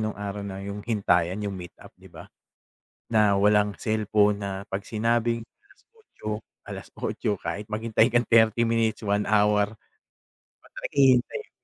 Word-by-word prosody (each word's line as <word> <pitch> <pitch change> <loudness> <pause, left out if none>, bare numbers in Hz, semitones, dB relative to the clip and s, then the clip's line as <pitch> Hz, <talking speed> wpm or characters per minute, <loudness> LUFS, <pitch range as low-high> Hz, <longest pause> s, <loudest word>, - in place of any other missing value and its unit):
nung 110 -1 -2
araw 100 0 -4
na 100 -1 -6
yung 100 +1 -5
hintayan 100 -3 +1
yung 100 - -2
meet 90 -2 -9
up, - - -15
'di - - -15
ba? - - -12 0.8
Na 105 -3 +3
walang 105 0 +3
cellphone 105 -1 +2
na 100 - -3 0.2
'pag 95 +1 -4
sinabing 115 +1 0 0.2
8:00, 410 - -14 0.4
8:00, 105 - -4
kahit 105 - -4
maghintay 110 0 +2
kang 120 0 +2
30 115 0 +4
minutes, 115 -1 +1
1 105 -1 0
hour. 105 0 +2
'Di 110 - -22 0.7
ba, - - -18
talagang - - -7
hihintayin? 130 - +2
105 Hz, 150 wpm, -26 LUFS, 105-115 Hz, 0.8 s, 30